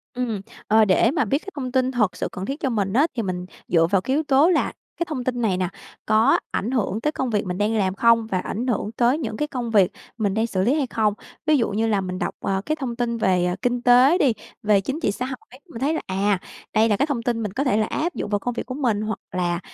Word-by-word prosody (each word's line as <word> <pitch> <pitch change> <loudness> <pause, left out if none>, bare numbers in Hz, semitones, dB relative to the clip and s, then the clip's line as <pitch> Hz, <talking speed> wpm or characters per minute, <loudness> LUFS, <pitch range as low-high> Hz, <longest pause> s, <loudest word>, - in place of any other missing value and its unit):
Ừm, 235 -5 -2 0.3
ờ, 220 0 +5
để 210 +5 +4
mà 295 -5 +1
biết 270 +7 +1
cái 395 - -8
thông 255 -3 -4
tin 260 0 +1
thật 215 -7 +1
sự - - -2
cần 190 +1 -5
thiết 275 +3 -4
cho 270 - 0
mình 200 -4 -1
á, 290 +7 +4
thì 230 - 0
mình 180 -1 -3 0.2
dựa 165 -1 +3
vào 195 -2 +3
cái 265 +7 -1
yếu 310 - +1
tố 285 +4 +4
là 345 - +2 0.3
cái 340 - -1
thông 260 -5 -3
tin 245 -1 -2
này 195 -5 +1
nè, 180 -1 -1 0.4
có 220 +5 +4
ảnh 230 +6 -2
hưởng 220 -3 -1
tới 300 - +1
công 265 -4 -2
việc 210 -3 0
mình 180 0 -3
đang 210 +2 +1
làm 190 -2 0
không 230 0 +4
và 190 -4 -1
ảnh 225 +7 -3
hưởng 215 -3 -1
tới 240 +4 +2
những 220 -6 -4
cái 300 - -1
công 245 -5 -4
việc 200 -3 +4 0.3
mình 205 -4 0
đang 220 +2 +1
xử 185 -4 -1
lý 245 +7 +3
hay 290 -4 0
không. 215 -3 +1 0.3
Ví 305 -1 +4
dụ 230 - +1
như 220 +3 0
là 205 -3 +1
mình 185 -1 -4
đọc, - - -2
ờ, 195 0 -1
cái 310 - 0
thông 260 -6 -4
tin 235 -1 -1
về, 185 -4 +2
ờ, 180 - 0
kinh 245 -1 0
tế 250 +7 +6
đi, 270 -9 +3 0.3
về 205 -2 +4
chính 270 - -3
trị 210 - +1
xã 250 - -4
hội, 255 0 -9
mình 230 - -8
thấy 295 +4 +1
là, - - -2
à, 195 +1 +1 0.3
đây 220 +1 +4
là 205 - +2
cái - - +2
thông 270 -6 -2
tin 235 -3 -1
mình 205 - -4
có 270 - 0
thể 255 -7 +2
là 215 - +2
áp 340 +3 -2
dụng - - -3
vào 205 -1 +1
công 245 +4 -3
việc - - -4
của 255 - -5
mình, 240 -7 0
hoặc 215 +1 -3
là 175 -1 -1
230 Hz, 285 wpm, -23 LUFS, 200-260 Hz, 0.4 s, tế